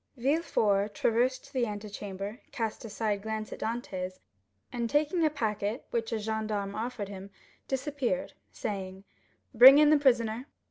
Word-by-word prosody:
Villefort 220 Hz, -8 st, +1 dB
traversed 250 Hz, +3 st, 0 dB
the 250 Hz, -3 st, +1 dB
antechamber, 205 Hz, 0 st, -6 dB
cast 225 Hz, -1 st, -3 dB
a 225 Hz, -, -7 dB
side 210 Hz, -1 st, -1 dB
glance 215 Hz, 0 st, -4 dB
at -, -, -9 dB
Dantès, 185 Hz, -6 st, -4 dB, 0.6 s
and 235 Hz, -2 st, -2 dB
taking 305 Hz, +5 st, +2 dB
a 310 Hz, -, +4 dB
packet 220 Hz, -5 st, -2 dB
which 230 Hz, -1 st, -1 dB
a 225 Hz, -, 0 dB
gendarme 215 Hz, -2 st, -2 dB
offered 220 Hz, -1 st, -4 dB
him, 195 Hz, 0 st, -8 dB, 0.4 s
disappeared, 275 Hz, 0 st, -2 dB, 0.2 s
saying, 190 Hz, -2 st, -5 dB, 0.5 s
"Bring 260 Hz, +4 st, +10 dB
in 300 Hz, 0 st, +6 dB
the 305 Hz, -, +5 dB
prisoner." 240 Hz, -2 st, +2 dB
225 Hz, 140 wpm, -29 LUFS, 205-255 Hz, 0.6 s, Bring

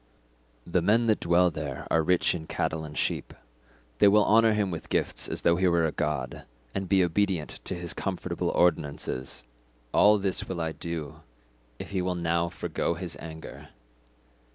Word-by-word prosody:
The 85 Hz, +1 st, +1 dB
men 110 Hz, +7 st, +3 dB
that 110 Hz, -2 st, +2 dB
dwell 85 Hz, +1 st, +3 dB
there 70 Hz, -3 st, -5 dB
are 80 Hz, -, +4 dB
rich 90 Hz, +2 st, +2 dB
in 80 Hz, -3 st, -6 dB
cattle 80 Hz, 0 st, -2 dB
and 75 Hz, -1 st, -8 dB
sheep; -, -, -2 dB, 0.6 s
they -, -, +7 dB
will 105 Hz, +1 st, +5 dB
honour 115 Hz, 0 st, +5 dB
him 105 Hz, -3 st, 0 dB
with 85 Hz, -, -6 dB
gifts -, -, 0 dB
as -, -, -4 dB
though 85 Hz, 0 st, +4 dB
he 95 Hz, +1 st, +2 dB
were 85 Hz, -2 st, +3 dB
a 80 Hz, -, 0 dB
god, 70 Hz, -5 st, -3 dB, 0.3 s
and 95 Hz, -2 st, -3 dB
be 95 Hz, -1 st, +4 dB
obedient 90 Hz, -2 st, -1 dB
to -, -, -3 dB
his 85 Hz, -1 st, -5 dB
comfortable -, -, -3 dB
ordinances. 70 Hz, -6 st, 0 dB, 0.5 s
All 105 Hz, +1 st, +6 dB
this 95 Hz, -2 st, +1 dB
will 90 Hz, -2 st, -3 dB
I 80 Hz, -1 st, -1 dB
do 80 Hz, -2 st, -6 dB, 0.6 s
if -, -, -8 dB
he 95 Hz, -2 st, 0 dB
will 90 Hz, 0 st, -1 dB
now 85 Hz, 0 st, 0 dB
forgo 85 Hz, -, -2 dB
his 85 Hz, 0 st, -5 dB
anger. 80 Hz, -1 st, -9 dB
85 Hz, 175 wpm, -27 LUFS, 80-95 Hz, 0.6 s, they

